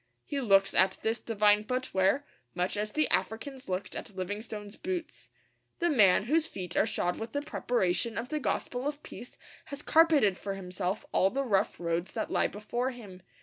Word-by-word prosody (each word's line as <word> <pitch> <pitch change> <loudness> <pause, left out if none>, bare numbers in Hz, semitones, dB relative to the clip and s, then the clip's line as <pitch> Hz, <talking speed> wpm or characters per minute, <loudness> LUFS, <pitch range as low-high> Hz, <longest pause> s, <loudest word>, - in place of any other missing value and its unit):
He 285 -2 -2
looks 195 -5 +4
at 190 - +4
this 225 +1 0
divine 210 -2 +3
footwear 250 +1 +1 0.3
much 180 +3 -1
as 210 +1 -2
the 310 +4 +2
Africans 260 +3 -2
looked 185 +1 -3
at 205 - -7
Livingstone's 205 +2 -5
boots. 360 -1 -5 0.5
The 345 -1 +1
man 200 -9 +5
whose 315 +7 +2
feet 180 -3 -7
are 215 - +3
shod 175 -5 -1
with 225 +1 -6
the 285 0 -1
preparation 230 -5 0
of 240 +2 -3
the 305 - -1
gospel 245 +3 -2
of 290 0 -4
peace 245 - -10 0.3
has 285 0 -6
carpeted 300 - +4
for 195 -1 -4
himself 185 +1 -3
all 190 - +4
the 275 +5 -2
rough 205 -3 +1
roads 170 +1 -2
that - - -3
lie - - +3
before 240 +5 -3
him. 205 -8 -10
215 Hz, 180 wpm, -30 LUFS, 195-265 Hz, 0.5 s, man